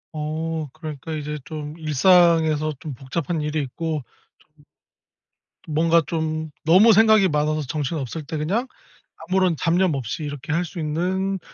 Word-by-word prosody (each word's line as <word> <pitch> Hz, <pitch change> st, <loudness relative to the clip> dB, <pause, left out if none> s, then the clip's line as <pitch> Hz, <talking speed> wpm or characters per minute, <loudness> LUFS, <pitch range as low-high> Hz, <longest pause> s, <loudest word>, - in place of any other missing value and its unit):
어 155 Hz, +1 st, -3 dB
그러니까 155 Hz, -1 st, -7 dB
이제 150 Hz, 0 st, -4 dB
좀 150 Hz, -1 st, -7 dB
일상에서 155 Hz, -1 st, +3 dB
좀 150 Hz, -4 st, -6 dB
복잡한 150 Hz, +5 st, -3 dB
일이 150 Hz, +1 st, -1 dB
있고 155 Hz, +2 st, -4 dB, 0.3 s
좀 150 Hz, -1 st, -27 dB, 1.0 s
뭔가 165 Hz, +2 st, +3 dB
좀 160 Hz, -1 st, -2 dB, 0.2 s
너무 190 Hz, +8 st, +7 dB
생각이 220 Hz, -3 st, +5 dB
많아서 150 Hz, +1 st, 0 dB
정신없을 145 Hz, +1 st, -3 dB
때 155 Hz, -, -4 dB
그냥 200 Hz, +12 st, -1 dB, 0.6 s
아무런 185 Hz, -3 st, +2 dB
잡념 175 Hz, +1 st, +2 dB
없이 135 Hz, +4 st, -4 dB
이렇게 145 Hz, +2 st, -5 dB
할 170 Hz, +2 st, +1 dB
수 170 Hz, +1 st, -8 dB
있는 185 Hz, +5 st, -1 dB
155 Hz, 275 characters per minute, -23 LUFS, 150-170 Hz, 1.0 s, 너무